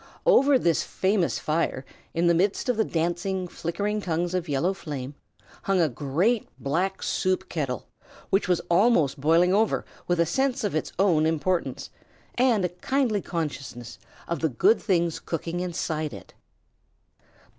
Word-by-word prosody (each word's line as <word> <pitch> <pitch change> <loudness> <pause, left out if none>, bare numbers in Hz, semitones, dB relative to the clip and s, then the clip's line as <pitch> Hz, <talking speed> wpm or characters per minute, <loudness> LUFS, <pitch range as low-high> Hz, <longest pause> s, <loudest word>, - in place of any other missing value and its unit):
Over 285 - +6
this 170 -9 +2
famous 190 -2 0
fire, 155 -4 -1 0.3
in 170 +1 +2
the 170 - +5
very - - +2
midst 205 +5 -4
of 245 - +1
the 220 - +3
dancing, 175 +2 -1
flickering 200 +5 -3
tongues 175 -1 -1
of 180 -3 -2
yellow 145 +7 +1
flame, 145 -7 -6 0.5
hung 195 -1 +2
a 165 -3 +3
great 160 - 0
black 180 +8 -1
soup 185 0 0
kettle, 135 -8 -3 0.5
which 195 - +2
was 180 -2 +2
almost 170 - +2
boiling 170 +5 +4
over 215 +2 +2 0.2
with 175 -1 +1
a 170 - +4
sense 265 - 0
of 205 - -1
its 155 - -2
own 170 -5 +3
importance, 165 +3 -1 0.4
and 240 -6 +2
a - - 0
kindly 220 +4 0
consciousness 135 -9 -5 0.3
of 170 -2 -2
the 160 - +1
good 190 - +3
things 170 -5 +1
cooking 165 +1 -4
inside 160 -5 -2
it. 100 - -13
175 Hz, 155 wpm, -26 LUFS, 160-195 Hz, 0.5 s, Over